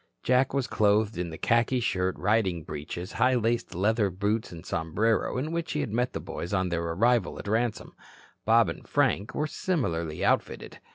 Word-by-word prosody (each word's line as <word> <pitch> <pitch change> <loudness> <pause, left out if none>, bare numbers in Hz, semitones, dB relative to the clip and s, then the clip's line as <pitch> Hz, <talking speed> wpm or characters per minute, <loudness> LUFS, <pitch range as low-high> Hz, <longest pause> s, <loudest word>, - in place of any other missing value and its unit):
Jack 130 +1 +3
was 140 -2 0
clothed 105 +1 +2
in 85 -1 -3
the 80 - -7
khaki 115 +2 +2
shirt, 95 -5 0
riding 95 -5 +1
breeches, 80 +6 -6
high 130 0 +2
laced 120 -3 0
leather 105 +2 +2
boots 100 +4 -1
and 85 0 -10
sombrero 100 +11 0
in 150 +5 -2
which 170 0 -2
he 150 - 0
had 105 - -4
met 120 +2 0
the - - -3
boys 85 +4 -4
on 95 -1 0
their 85 -1 -1
arrival 95 +5 +1
at - - -8
Ransome. 115 +1 -1 0.5
Bob 115 -1 +5
and 85 - -6
Frank 105 +4 +1
were 150 - 0
similarly 85 - -2
outfitted. - - -1
105 Hz, 180 wpm, -27 LUFS, 90-120 Hz, 0.5 s, Bob